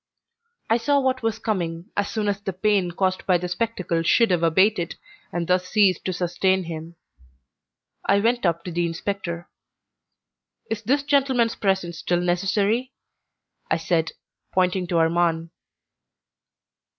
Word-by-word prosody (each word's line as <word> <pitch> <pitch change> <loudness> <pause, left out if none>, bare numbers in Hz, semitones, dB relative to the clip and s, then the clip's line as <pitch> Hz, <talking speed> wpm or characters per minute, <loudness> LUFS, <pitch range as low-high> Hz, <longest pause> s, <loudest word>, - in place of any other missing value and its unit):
I 225 - +3
saw 285 +4 +2
what 260 -1 0
was 225 -2 -1
coming 175 -7 -3
as 205 0 0
soon 215 -2 -2
as 205 0 -1
the 195 -1 -4
pain 195 -1 +1
caused 185 +1 -1
by 180 -2 +5
the 180 +1 -4
spectacle 180 -4 -1
should 225 +6 +3
have 175 -2 +2
abated 175 +2 +2 0.4
and 170 0 -2
thus 180 +1 +1
ceased 195 -4 +3
to 185 - 0
sustain 185 +2 +1
him. 165 0 -7 1.1
I 200 - +3
went 235 +3 +1
up 170 -2 +1
to 180 - -6
the 170 0 0
inspector. 170 0 -4 1.2
"Is 220 -1 -2
this 275 +6 +1
gentleman's 265 -5 +2
presence 190 -4 -1
still 175 -1 0
necessary?" 200 +8 0 0.8
I - - +2
said, 165 0 0 0.4
pointing 185 0 +1
to 175 -2 0
Armand. 165 0 +1
185 Hz, 140 wpm, -24 LUFS, 170-215 Hz, 1.2 s, by